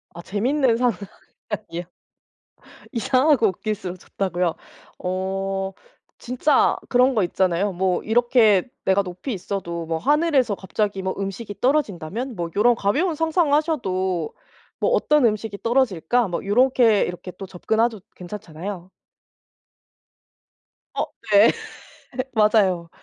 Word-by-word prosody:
아 170 - -7
재밌는 235 +6 +1
상상이요. 200 -5 -4 1.1
이상 260 +4 +2
하고 240 -7 +5
웃길수록 190 -1 -4
좋다고요. 180 -2 -2 0.4
어 195 +1 -2 0.5
진짜 250 +5 +2
그런 250 +1 +4
거 210 - +3
있잖아요. 185 +2 +1
뭐 185 0 0
이렇게 225 -3 +3 0.2
’내가 190 +1 +3
높이 185 +8 -6
있어도 175 -3 -4
뭐 160 0 -2
하늘에서 285 - +2
갑자기 195 +1 -2
뭐 190 0 -2
음식이 200 +2 -6
떨어진다면?‘ 245 - -1
뭐 170 -2 -3
요런 235 +4 +4
가벼운 300 - 0
상상을 325 -1 +1
하셔도 190 - 0 0.5
‘뭐 - - +2
어떤 300 - +3
음식이 215 -2 -1
떨어질까?‘ 235 -2 +1
뭐 175 0 -4
요렇게 235 0 +4
이렇게 180 +1 -5
또 195 - -6
접근하도 220 +4 -1
괜찮잖아요. 180 -1 -7 2.0
어 - - -1 0.3
네. 205 +2 +7 0.8
맞아요. 205 -6 +3
205 Hz, 265 characters per minute, -23 LUFS, 185-245 Hz, 2.0 s, 네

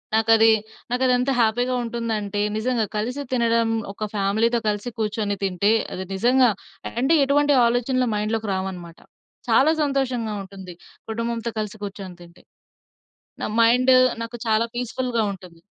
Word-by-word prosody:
నాకది 225 0 +5 0.4
నాకదెంత 250 +1 +2
హ్యాపీ‌గా 245 +3 +1
ఉంటుందంటే 225 -3 -3 0.2
నిజంగా 230 -1 0
కలిసి 250 +7 -3
తినడం 230 -2 +2 0.2
ఒక 215 - -4
ఫ్యామిలీతో 220 +4 +1
కలిసి 210 +3 -3
కూర్చొని 210 -1 -1
తింటే, 195 +3 +1 0.2
అది 185 - -5
నిజంగా 245 +4 +4 0.5
అంటే 285 +6 +3
ఎటువంటి 290 +1 +3
ఆలోచనలు 250 +1 0
మైండ్‌లోకి 215 0 -2
రావనమాట. 180 -3 -6 0.5
చాలా 300 +4 +5
సంతోషంగా 260 -6 -1
ఉంటుంది. 190 -2 -10 0.4
కుటుంబంతో 230 +1 -3
కలిసి 215 0 -4
కూర్చొని 195 -2 -7
తింటే. 170 0 -16 1.0
నా - - -1 0.2
మైండు 250 +3 +5 0.3
నాకు 230 +1 -6
చాలా 220 +1 +2
పీస్‌ఫుల్‌గా 245 0 -2
ఉంటుంది. 180 -3 -12
225 Hz, 120 wpm, -23 LUFS, 205-245 Hz, 1.0 s, నాకది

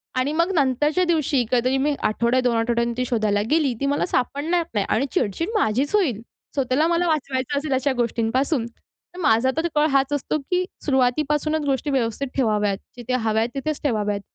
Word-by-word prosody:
आणि 255 +3 0
मग 335 +4 +1
नंतरच्या 295 +4 +2
दिवशी 305 -6 +1
कधीतरी 255 +2 +2
मी 285 +2 +1
आठवड्या, 235 +4 +1
2 245 -2 +1
आठवड्यांनी 235 +1 0
ती 250 - 0
शोधायला 215 -4 +1
गेली, 300 -5 +2
ती - - +1
मला 285 +1 +1
सापडणार 310 +5 0
नाही 205 -2 0
आणि 230 +6 +1
चिडचिड 330 - -1
माझीच 280 - +1
होईल. 260 - +1 0.3
स्वतःला 275 +3 +1
मला 345 +1 +1
वाचवायचं 280 -3 -1
असेल 285 -2 -3
अशा 265 +1 +1
गोष्टींपासून, 240 +3 0
तर 350 +8 -18
माझा 235 -1 +3
तर 330 - +1
कळ 300 +1 +4
हाच 275 +1 +2
असतो, 290 +2 -1
की 360 +6 -1 0.2
सुरुवातीपासूनच 295 +3 +1
गोष्टी 275 +1 -1
व्यवस्थित 260 0 -1
ठेवाव्यात. 210 -5 +1 0.2
जिथे 245 +1 -4
हव्या 220 -3 +1
आहेत 230 - 0
तिथेच 310 +1 -3
ठेवाव्यात 210 -6 0
265 Hz, 175 wpm, -23 LUFS, 235-300 Hz, 0.3 s, कळ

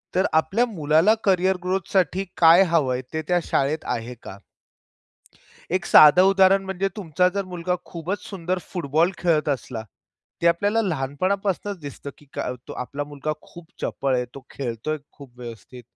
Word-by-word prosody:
तर 190 +2 +3
आपल्या 175 +9 +2
मुलाला 165 -2 +3
करिअर 190 -1 +3
ग्रोथसाठी 190 0 0
काय 170 +2 +7
हवंय, 135 -7 +1
ते 160 - -1
त्या 180 -1 +2
शाळेत 150 +2 -1
आहे 120 +1 -6
का? 95 - -9 1.3
एक 185 +1 0
साधं 155 +4 +8
उदाहरण 195 0 +4
म्हणजे, 190 0 -2
तुमचा 180 -2 +1
जर 200 0 -1
मुलगा 180 -1 -3
खूपच 180 +5 -5
सुंदर 185 -2 -3
फुटबॉल 165 0 +1
खेळत 165 -4 +1
असला, 125 -4 -3 0.6
ते - - +3
आपल्याला 205 +7 +2
लहानपणापासूनच 185 +5 -2
दिसतं, 145 -1 -8
की 150 - -20
त 125 0 -5
आपला 140 +3 -4
मुलगा 145 +1 -4
खूप 170 -1 -14 0.2
चपळ 135 -1 -1
आहे, 125 0 0
तो 135 - -11
खेळतोय 135 +4 -4
खूप 130 -4 -15
व्यवस्थित. 120 +1 -10
165 Hz, 145 wpm, -23 LUFS, 140-190 Hz, 1.3 s, साधं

